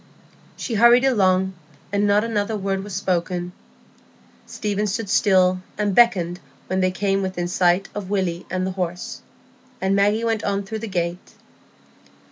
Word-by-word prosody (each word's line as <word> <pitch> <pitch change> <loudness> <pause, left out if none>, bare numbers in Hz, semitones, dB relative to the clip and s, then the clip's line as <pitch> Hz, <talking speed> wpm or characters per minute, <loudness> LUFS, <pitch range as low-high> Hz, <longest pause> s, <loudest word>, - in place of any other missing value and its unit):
She 240 - -4
hurried 235 +4 +6
along, 190 -6 +2 0.4
and 205 0 +1
not 205 +1 +3
another 220 -1 -1
word 195 -1 -2
was 200 -2 -7
spoken. 180 -2 -1 1.0
Stephen 210 0 -2
stood 205 0 -3
still 185 -2 +3 0.2
and 205 -1 0
beckoned 180 -7 +3 0.3
when 185 +1 -1
they 185 0 +2
came 195 +1 0
within 185 -2 -2
sight 180 +1 +2
of 200 -2 -6
Willy 185 -4 -2
and 185 0 -1
the 190 - -2
horse, 180 -1 -4 0.6
and 190 +1 +1
Maggie 205 +3 +2
went 225 -2 0
on 200 0 -1
through 220 +3 -5
the 225 - -5
gate. 175 -2 -3
195 Hz, 150 wpm, -22 LUFS, 185-210 Hz, 1.0 s, hurried